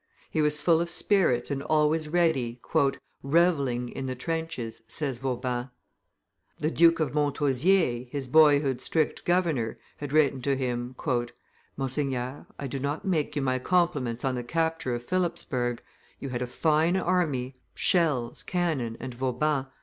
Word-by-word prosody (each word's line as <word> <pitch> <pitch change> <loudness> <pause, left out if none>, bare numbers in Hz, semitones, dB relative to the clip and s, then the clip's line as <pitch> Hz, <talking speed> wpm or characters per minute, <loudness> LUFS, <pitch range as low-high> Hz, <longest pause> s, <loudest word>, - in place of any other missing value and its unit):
He 155 - +1
was 150 0 +2
full 165 -2 +4
of 170 - -2
spirits 165 -9 +2
and 140 -1 -2
always 155 +1 +1
ready, 150 -8 +1 0.6
"revelling 140 -5 +2
in 135 +1 -5
the 130 - -3
trenches," 130 -6 -4
says 130 +1 -3
Vauban. 125 -1 -2 0.9
The 155 +1 -1
Duke 170 0 +5
of 155 - 0
Montausier, 145 -1 +2
his 135 0 -4
boyhood's 145 -3 +4
strict 160 -2 0
governor, 165 -11 +1 0.2
had 145 -1 -6
written 145 -3 +3
to 140 +2 +1
him, 125 -1 -3 0.8
"Monseigneur, 135 -1 -2
I 140 - -5
do 135 +1 -4
not 145 +7 -3
make 160 -6 0
you 145 - 0
my 130 -1 +1
compliments 145 -7 0
on 130 - +1
the 125 -1 -3
capture 160 -1 -1
of 120 - -6
Philipsburg; 125 -8 -1 0.4
you 135 - -5
had 125 -1 -3
a 125 - -1
fine 160 +6 +2
army, 150 -9 0 0.2
shells, 150 -10 +1
cannon, 155 -11 -1
and 130 -1 -6
Vauban. 135 +3 0
140 Hz, 145 wpm, -27 LUFS, 125-160 Hz, 0.9 s, Duke